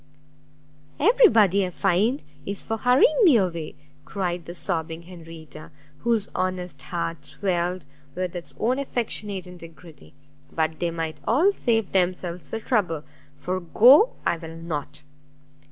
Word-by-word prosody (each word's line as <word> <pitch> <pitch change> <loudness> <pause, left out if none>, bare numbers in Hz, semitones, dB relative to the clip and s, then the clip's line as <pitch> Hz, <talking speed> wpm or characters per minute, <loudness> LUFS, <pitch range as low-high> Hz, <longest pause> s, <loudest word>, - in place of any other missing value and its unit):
"Every 465 - +6
body, 200 - +4
I 185 - -1
find, 200 - +1 0.2
is 200 0 -5
for 225 - -3
hurrying 255 - +4
me 315 - +7
away," 170 -6 -2 0.3
cried 175 +1 -3
the 175 - -8
sobbing 165 -1 -3
Henrietta, 165 -3 -12 0.3
whose 230 -3 0
honest 185 -1 -3
heart 170 -2 -4
swelled 180 -3 -2 0.3
with 180 0 -3
its 175 - -8
own 250 +4 +1
affectionate 210 -7 -3
integrity; 165 - -14 0.4
"but 160 -1 -1
they 175 - 0
might 165 -1 -4
all 315 - +4
save 225 - 0
themselves 180 -1 -1
the 225 - -3
trouble, 185 - 0 0.3
for 185 +1 -3
go 250 - +6
I 170 - +1
will 165 0 -9
not!" 155 -3 -5
180 Hz, 135 wpm, -24 LUFS, 165-220 Hz, 0.4 s, me